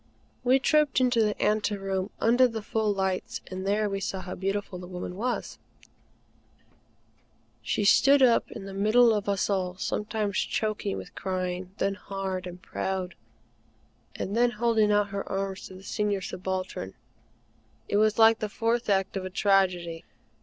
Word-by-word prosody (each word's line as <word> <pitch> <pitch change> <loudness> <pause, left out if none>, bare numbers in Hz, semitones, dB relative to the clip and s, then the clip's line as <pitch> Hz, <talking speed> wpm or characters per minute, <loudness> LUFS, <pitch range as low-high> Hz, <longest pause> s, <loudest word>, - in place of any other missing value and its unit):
We 255 +1 +5
trooped 300 0 +3
into 250 -2 +3
the 210 -1 0
ante 210 0 +1
room, 195 0 -2
under 245 +3 +5
the 225 -3 -5
full 220 0 0
lights, 190 -2 -2
and 185 +1 -4
there 210 +1 +2
we 195 -1 -2
saw 190 -1 -3
how 185 0 -6
beautiful 195 0 -3
the 180 - -8
woman 180 0 -6
was. 240 +5 -3 2.0
She - - -1
stood 275 +6 +6
up 240 -2 +4
in 195 - -8
the 195 - -7
middle 220 +4 +4
of 205 -1 -1
us 200 -1 +1
all, 185 -2 -1
sometimes 210 0 -2
choking 215 -2 -1
with - - -9
crying, 185 -1 -3
then 195 - 0
hard 190 -1 -4
and 180 0 -9
proud, 185 -1 -3 1.0
and 200 - -3
then 240 +1 +4
holding 225 -2 +2
out 205 0 +2
her 200 0 -5
arms 195 -1 -3
to 190 - -12
the 190 - -12
Senior 205 -1 -1
Subaltern. 185 - -4 0.9
It 205 - +1
was 215 0 +3
like 225 0 +6
the 215 - -3
fourth 230 +2 -1
act 195 -1 +1
of 190 - -2
a 185 - -4
tragedy. 180 -4 +1
200 Hz, 160 wpm, -27 LUFS, 190-220 Hz, 2.0 s, stood